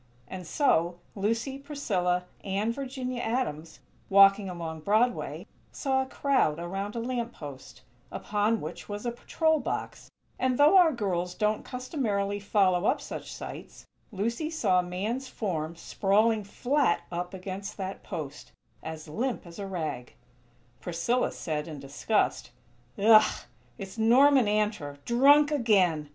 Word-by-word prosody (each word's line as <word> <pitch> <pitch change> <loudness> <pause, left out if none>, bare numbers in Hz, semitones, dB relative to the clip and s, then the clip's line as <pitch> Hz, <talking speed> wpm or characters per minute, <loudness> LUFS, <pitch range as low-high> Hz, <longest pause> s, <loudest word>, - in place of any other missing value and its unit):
And 185 -3 -8
so, 175 - +2 0.2
Lucy, 230 +7 -1
Priscilla, 185 -12 -1 0.2
and 205 +4 -1
Virginia 255 -2 -4
Adams, 225 - -3 0.3
walking 195 0 +6
along 165 -3 -5
Broadway, 215 +8 0 0.3
saw 265 -1 0
a 265 - -4
crowd 265 - +1
around 195 +5 -4
a - - -2
lamp 240 0 -3
post, 140 -4 -10 0.3
upon 210 +2 0
which 155 +7 -7
was 205 +2 -5
a 240 - 0
patrol 315 +6 +1
box; - - -5 0.3
and, 255 -1 +1
though 295 +5 +6
our 355 -4 +7
girls 180 - -2
don't 210 0 0
customarily 220 - -2
follow 195 -2 +2
up - - +2
such - - -7
sights, - - -9 0.3
Lucy 230 +9 -2
saw 250 - +2
a 180 0 -3
man's 220 +9 -3
form 170 -9 -3
sprawling 210 +5 +1
flat 255 +2 +1
up 180 +2 -4
against 190 +2 -6
that 195 -1 -5
post, 140 - -7 0.3
as 160 0 -7
limp 230 - -3
as 170 +3 -11
a 200 - -4
rag. 155 - -5 0.6
Priscilla 180 +9 0
said, 150 -2 -4
in 155 -3 -7
disgust: 140 +10 -1 0.5
"Ugh!! 215 +1 +5 0.4
It's 195 0 -8
Norman 255 +2 +5
Antor! 210 -9 -1
Drunk 285 +5 +5
again!!" 190 - +2
205 Hz, 135 wpm, -28 LUFS, 180-245 Hz, 0.6 s, our